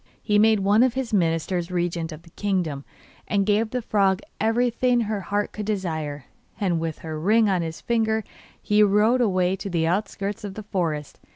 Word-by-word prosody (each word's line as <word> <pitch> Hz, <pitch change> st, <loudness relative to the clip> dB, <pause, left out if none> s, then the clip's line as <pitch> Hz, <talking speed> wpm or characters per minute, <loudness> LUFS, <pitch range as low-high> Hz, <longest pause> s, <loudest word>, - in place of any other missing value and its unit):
He 210 Hz, -1 st, +3 dB
made 220 Hz, -1 st, +4 dB
one 205 Hz, +3 st, +4 dB
of 255 Hz, -1 st, +3 dB
his 260 Hz, -4 st, -3 dB
ministers 170 Hz, -1 st, 0 dB
regent 175 Hz, -2 st, -2 dB
of 155 Hz, +1 st, -10 dB
the 165 Hz, -, -18 dB
kingdom, 175 Hz, -9 st, -2 dB, 0.4 s
and 200 Hz, -1 st, +1 dB
gave 215 Hz, +2 st, +2 dB
the 250 Hz, 0 st, -3 dB
frog 195 Hz, -2 st, +2 dB, 0.2 s
everything 240 Hz, +2 st, +2 dB
her 215 Hz, -2 st, -2 dB
heart 205 Hz, +3 st, -2 dB
could 210 Hz, -1 st, -6 dB
desire; 160 Hz, -, -3 dB, 0.3 s
and 180 Hz, -5 st, +1 dB
with 160 Hz, -1 st, -3 dB
her 155 Hz, -1 st, -4 dB
ring 215 Hz, +6 st, +3 dB
on 185 Hz, -3 st, +1 dB
his 160 Hz, -1 st, -5 dB
finger 220 Hz, -2 st, 0 dB, 0.4 s
he 210 Hz, 0 st, +2 dB
rode 210 Hz, +5 st, +4 dB
away 185 Hz, -4 st, +2 dB
to 195 Hz, +1 st, -5 dB
the 170 Hz, -3 st, 0 dB
outskirts 200 Hz, +3 st, -2 dB
of 200 Hz, -2 st, -6 dB
the 215 Hz, -, -7 dB
forest. 165 Hz, -8 st, -3 dB
200 Hz, 185 wpm, -24 LUFS, 170-215 Hz, 0.4 s, made